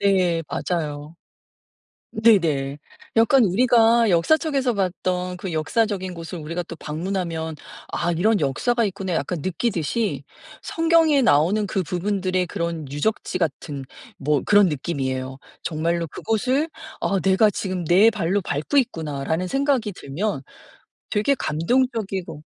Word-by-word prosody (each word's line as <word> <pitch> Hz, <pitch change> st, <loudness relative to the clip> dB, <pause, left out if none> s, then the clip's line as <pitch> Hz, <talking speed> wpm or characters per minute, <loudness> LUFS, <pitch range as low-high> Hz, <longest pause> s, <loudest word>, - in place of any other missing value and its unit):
네 185 Hz, -4 st, +2 dB
맞아요. 155 Hz, -2 st, -3 dB, 1.0 s
네네 160 Hz, -11 st, +2 dB, 0.4 s
약간 235 Hz, +3 st, +5 dB
우리가 230 Hz, +2 st, +4 dB
역사책에서 270 Hz, -, +2 dB
봤던 180 Hz, -2 st, -2 dB
그 180 Hz, 0 st, -5 dB
역사적인 185 Hz, +3 st, -1 dB
곳을 170 Hz, +1 st, -7 dB
우리가 165 Hz, +3 st, -4 dB
또 170 Hz, -, -9 dB
방문하면 165 Hz, 0 st, -3 dB, 0.4 s
'아 175 Hz, 0 st, 0 dB
이런 205 Hz, +6 st, +2 dB
역사가 230 Hz, -, +1 dB
있구나.' 190 Hz, -2 st, -3 dB
약간 165 Hz, +3 st, -2 dB
느끼듯이 185 Hz, -, -1 dB, 0.4 s
성경에 325 Hz, -3 st, +3 dB
나오는 195 Hz, -, +3 dB
그 190 Hz, -, -1 dB
부분들의 185 Hz, +1 st, -1 dB
그런 165 Hz, -4 st, -4 dB
유적지 185 Hz, +6 st, -1 dB
같은 145 Hz, -4 st, -3 dB, 0.3 s
뭐 145 Hz, 0 st, +1 dB
그런 205 Hz, -2 st, +5 dB
느낌이에요. 130 Hz, -3 st, -3 dB, 0.2 s
정말로 165 Hz, +1 st, -1 dB
그곳을 255 Hz, -, 0 dB, 0.3 s
'아 195 Hz, -, +1 dB
내가 190 Hz, +5 st, +4 dB
지금 185 Hz, -2 st, -3 dB
내 185 Hz, +7 st, +6 dB
발로 200 Hz, -2 st, 0 dB
밟고 155 Hz, -, -1 dB
있구나.'라는 160 Hz, -, -1 dB
생각이 270 Hz, -2 st, +1 dB
들면 170 Hz, +2 st, -3 dB, 0.7 s
되게 215 Hz, +7 st, +2 dB
감동적이고 195 Hz, -, -1 dB
185 Hz, 285 characters per minute, -23 LUFS, 160-220 Hz, 1.0 s, 내